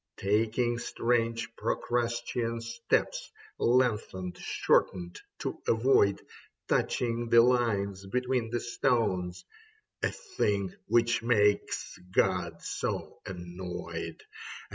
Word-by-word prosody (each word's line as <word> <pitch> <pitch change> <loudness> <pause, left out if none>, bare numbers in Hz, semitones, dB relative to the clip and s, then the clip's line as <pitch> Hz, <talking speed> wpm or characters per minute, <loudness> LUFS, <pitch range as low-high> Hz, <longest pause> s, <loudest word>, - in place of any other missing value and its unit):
Taking 115 +4 +1
strange 115 -1 0
Procrustean 120 -1 -1
steps. 115 0 -1 0.3
Lengthened, 105 -7 +1
shortened 90 -2 +1 0.2
to - - -4
avoid 110 -4 +4 0.5
Touching 120 -1 0
the 115 0 +8
lines 100 -6 +1
between 125 +1 0
the 120 0 -1
stones 95 -7 0 0.3
— 435 -1 -40
A - - +2
thing 105 - -1
which 115 0 +3
makes 105 -3 +1
God - - +1
so - - -3
annoyed. 90 -1 -6
115 Hz, 90 wpm, -30 LUFS, 100-120 Hz, 0.5 s, the